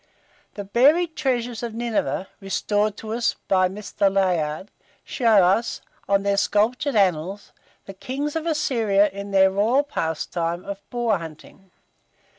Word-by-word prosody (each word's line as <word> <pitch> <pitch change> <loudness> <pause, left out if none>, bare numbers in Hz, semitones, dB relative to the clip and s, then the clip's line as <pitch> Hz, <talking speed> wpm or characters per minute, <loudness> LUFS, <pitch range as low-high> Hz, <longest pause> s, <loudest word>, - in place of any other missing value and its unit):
The 205 - -5
buried 295 - +3
treasures 245 -4 -1
of 235 -2 -5
Nineveh, 230 -4 -2
restored 205 +2 -1
to 220 0 -6
us 235 0 0
by 185 -1 +3
Mr. 200 0 -1
Layard, 180 -2 0 0.3
show 225 -6 +3
us, 195 +6 +1 0.3
on 200 0 +2
their 200 0 +1
sculptured 230 +7 +1
annals, 190 0 0 0.3
the 195 - -9
kings 275 +9 -4
of 325 +1 -2
Assyria 225 -10 +2
in 200 +1 -7
their 190 -1 +4
royal 225 +8 +2
pastime 170 - -3
of 200 0 -6
boar 235 -5 0
hunting. 165 +4 -12
205 Hz, 135 wpm, -23 LUFS, 190-240 Hz, 0.3 s, their